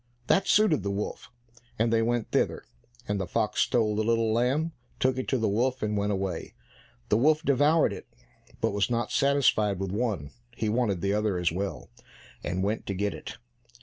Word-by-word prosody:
That 195 Hz, +8 st, +2 dB
suited 210 Hz, -8 st, +4 dB
the 100 Hz, -, -3 dB
wolf, 100 Hz, +1 st, -4 dB, 0.5 s
and 115 Hz, +1 st, +1 dB
they 115 Hz, -, +3 dB
went 120 Hz, 0 st, -1 dB
thither, -, -, 0 dB, 0.4 s
and 105 Hz, -1 st, -1 dB
the 95 Hz, -, -3 dB
fox 110 Hz, -2 st, 0 dB
stole 110 Hz, -3 st, +2 dB
the 110 Hz, -, +1 dB
little 115 Hz, 0 st, +2 dB
lamb, 135 Hz, +8 st, +1 dB, 0.3 s
took 130 Hz, 0 st, +1 dB
it 130 Hz, -, -4 dB
to 130 Hz, -, +1 dB
the 110 Hz, -2 st, 0 dB
wolf, 125 Hz, +5 st, 0 dB
and 105 Hz, 0 st, 0 dB
went 100 Hz, 0 st, 0 dB
away. 95 Hz, -4 st, -3 dB, 0.5 s
The 105 Hz, -, +4 dB
wolf 155 Hz, +6 st, +3 dB
devoured 145 Hz, +3 st, +3 dB
it, -, -, -9 dB, 0.5 s
but -, -, +1 dB
was 100 Hz, +1 st, +1 dB
not 120 Hz, -2 st, -1 dB
satisfied 135 Hz, -8 st, +2 dB
with 95 Hz, -1 st, -3 dB
one; 100 Hz, -, -2 dB, 0.2 s
he 110 Hz, -, -1 dB
wanted 105 Hz, -6 st, 0 dB
the 100 Hz, +2 st, +1 dB
other 105 Hz, -3 st, 0 dB
as 90 Hz, -2 st, +1 dB
well, 95 Hz, +4 st, -4 dB, 0.5 s
and 90 Hz, +2 st, -2 dB
went 105 Hz, +3 st, -2 dB
to 100 Hz, -, -2 dB
get 100 Hz, 0 st, -1 dB
it. -, -, -8 dB
110 Hz, 190 wpm, -27 LUFS, 100-125 Hz, 0.5 s, suited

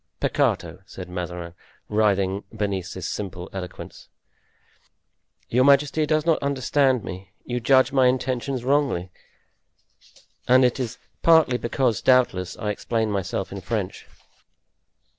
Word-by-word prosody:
"Peccato!" -, -, 0 dB
said -, -, -9 dB
Mazarin, 90 Hz, -1 st, -5 dB, 0.3 s
writhing 100 Hz, -2 st, +1 dB
beneath 95 Hz, -3 st, -2 dB
this 95 Hz, -2 st, -4 dB
simple 90 Hz, -3 st, -6 dB
eloquence, 90 Hz, -2 st, -8 dB, 1.4 s
"your 125 Hz, +2 st, +2 dB
majesty 140 Hz, +2 st, +3 dB
does 155 Hz, 0 st, +1 dB
not 165 Hz, -2 st, +2 dB
understand 135 Hz, -2 st, +1 dB
me; 95 Hz, 0 st, -8 dB, 0.2 s
you 125 Hz, 0 st, -2 dB
judge 130 Hz, +2 st, +4 dB
my 130 Hz, -2 st, +4 dB
intentions 130 Hz, 0 st, -1 dB
wrongly, 130 Hz, -10 st, 0 dB, 1.4 s
and 130 Hz, +1 st, +6 dB
that 125 Hz, +1 st, +2 dB
is 125 Hz, -1 st, -3 dB, 0.2 s
partly 160 Hz, -7 st, +5 dB
because, 120 Hz, 0 st, 0 dB
doubtless, 120 Hz, -9 st, +2 dB
I 105 Hz, -, -2 dB
explain 110 Hz, +1 st, -1 dB
myself 95 Hz, -1 st, -3 dB
in 100 Hz, 0 st, -6 dB
French." 100 Hz, -1 st, -4 dB
120 Hz, 120 wpm, -24 LUFS, 95-130 Hz, 1.4 s, and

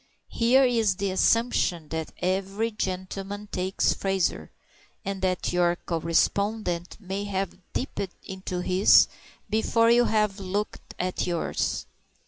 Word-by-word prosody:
Here 245 Hz, +4 st, +4 dB
is 225 Hz, -6 st, +2 dB
the 200 Hz, 0 st, -1 dB
assumption 185 Hz, -6 st, +2 dB
that 160 Hz, -1 st, -4 dB
every 195 Hz, +4 st, 0 dB
gentleman 195 Hz, +1 st, -4 dB
takes 185 Hz, +2 st, +1 dB
Fraser, 195 Hz, -2 st, -1 dB, 0.6 s
and 195 Hz, -1 st, -3 dB
that 185 Hz, -2 st, 0 dB
your 175 Hz, -1 st, +3 dB
correspondent 175 Hz, +2 st, 0 dB
may 195 Hz, 0 st, -4 dB
have 195 Hz, -2 st, -3 dB
dipped 200 Hz, -7 st, -3 dB
into 190 Hz, -2 st, -5 dB
his 185 Hz, +2 st, +6 dB, 0.4 s
before 230 Hz, +2 st, +3 dB
you 240 Hz, +1 st, +5 dB
have 210 Hz, -3 st, +1 dB
looked 200 Hz, +2 st, -4 dB
at 180 Hz, 0 st, -2 dB
yours. 170 Hz, -2 st, -1 dB
195 Hz, 115 wpm, -26 LUFS, 180-210 Hz, 0.6 s, his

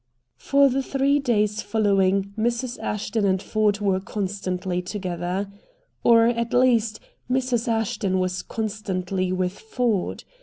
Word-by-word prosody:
For 280 Hz, 0 st, +4 dB
the 270 Hz, +1 st, +1 dB
three 275 Hz, +2 st, +1 dB
days 215 Hz, -5 st, +1 dB
following 200 Hz, -2 st, +1 dB
Mrs. 235 Hz, +2 st, -1 dB
Ashton 210 Hz, +1 st, -2 dB
and 190 Hz, -1 st, +2 dB
Ford 210 Hz, 0 st, +1 dB
were 195 Hz, -2 st, +2 dB
constantly 185 Hz, -2 st, -3 dB
together. 180 Hz, 0 st, -3 dB, 0.6 s
Or, 230 Hz, -1 st, +6 dB
at 235 Hz, 0 st, -1 dB
least, 235 Hz, -3 st, +3 dB, 0.3 s
Mrs. 250 Hz, -2 st, 0 dB
Ashton 225 Hz, -4 st, 0 dB
was 185 Hz, 0 st, -1 dB
constantly 195 Hz, -4 st, -3 dB
with 185 Hz, 0 st, -2 dB
Ford. 245 Hz, -, -1 dB
210 Hz, 120 wpm, -24 LUFS, 190-235 Hz, 0.6 s, Or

